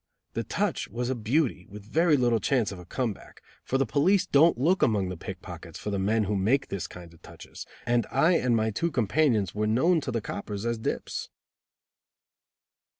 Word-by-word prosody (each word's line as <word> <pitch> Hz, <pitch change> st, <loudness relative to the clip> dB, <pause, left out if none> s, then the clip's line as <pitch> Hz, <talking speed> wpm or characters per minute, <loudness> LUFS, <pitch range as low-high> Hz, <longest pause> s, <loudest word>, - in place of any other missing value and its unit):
The -, -, -2 dB
"touch" -, -, -1 dB
was 120 Hz, +4 st, -3 dB
a -, -, +2 dB
beauty, 120 Hz, -, 0 dB
with 105 Hz, 0 st, -10 dB
very 160 Hz, +6 st, +3 dB
little 120 Hz, -3 st, +2 dB
chance 125 Hz, -6 st, +1 dB
of 95 Hz, -, -8 dB
a 90 Hz, -, -11 dB
come 125 Hz, -1 st, -1 dB
back, -, -, -16 dB, 0.2 s
for 135 Hz, -, 0 dB
the 135 Hz, -, +2 dB
police 175 Hz, +9 st, +2 dB
don't 160 Hz, +2 st, +4 dB
look 175 Hz, +10 st, +2 dB
among 100 Hz, -5 st, +2 dB
the 90 Hz, -, -4 dB
pickpockets 80 Hz, -, -8 dB
for 105 Hz, -, -5 dB
the 100 Hz, -, -1 dB
men 105 Hz, +3 st, +2 dB
who 105 Hz, +1 st, -1 dB
make 110 Hz, +8 st, +1 dB
this 100 Hz, -3 st, -4 dB
kind 85 Hz, -1 st, -12 dB
of 85 Hz, -, -20 dB
touches, -, -, -11 dB, 0.2 s
and 120 Hz, -1 st, +1 dB
I 150 Hz, +6 st, +3 dB
and 125 Hz, -9 st, +2 dB
my 110 Hz, 0 st, +1 dB
two 170 Hz, +11 st, -1 dB
companions 120 Hz, -, +1 dB
were 105 Hz, +1 st, -1 dB
known 160 Hz, +10 st, +3 dB
to 140 Hz, -, -5 dB
the 120 Hz, -, -1 dB
coppers 100 Hz, 0 st, -5 dB
as 115 Hz, -1 st, -1 dB
dips. -, -, -3 dB
115 Hz, 200 wpm, -27 LUFS, 105-140 Hz, 0.2 s, don't